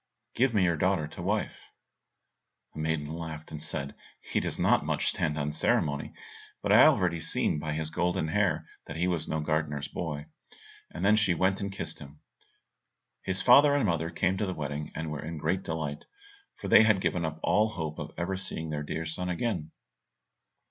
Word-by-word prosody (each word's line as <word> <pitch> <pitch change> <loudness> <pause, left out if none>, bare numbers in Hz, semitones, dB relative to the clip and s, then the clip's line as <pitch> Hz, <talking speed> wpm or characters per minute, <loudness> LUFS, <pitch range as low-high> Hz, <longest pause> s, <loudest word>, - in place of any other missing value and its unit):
Give 130 +1 +2
me 105 -4 +2
your 85 -3 +2
daughter 90 -2 +1
to 85 - -9
wife." 105 +4 -2 1.0
The - - -8
maiden 80 -1 -1
laughed, 80 0 -7
and 75 -1 -6
said, 70 -2 -3 0.3
"He - - -2
does - - -1
not - - +4 0.3
stand 75 - 0
much - - -3
on 75 - -2
ceremony, 75 -1 +1 0.5
but - - +1
I - - +8
have - - +8
already 85 -2 0
seen 80 -1 0
by 75 0 -3
his 80 0 -2
golden 90 -2 0
hair 80 -3 +1 0.2
that 80 - -6
he 85 +2 0
was 85 -3 -1
no 80 - -1
gardener's 75 -2 -1
boy," 75 -3 -4 0.6
and 90 - -4
then 105 +2 +5
she 100 -5 +3
went 95 +3 +1
and 100 0 -3
kissed 100 - -4
him. 70 +1 -12 1.0
His 95 0 -1
father 140 +3 +7
and 145 - +2
mother 85 -3 0
came 95 +2 0
to 105 - -1
the 95 - -3
wedding, 75 0 -4
and 80 0 -4
were 75 -2 -4
in 80 +1 -5
great 85 +5 0
delight, 80 -5 -4 0.5
for - - -7
they - - +8
had 110 -3 +4
given 90 -2 0
up 80 0 -3
all 110 +1 +3
hope 80 -6 -5
of - - -5
ever 90 +3 -1
seeing 80 -4 -3
their 75 -1 -2
dear 80 +2 -4
son 90 +3 -3
again. 90 -4 -2
80 Hz, 195 wpm, -29 LUFS, 75-95 Hz, 1.0 s, I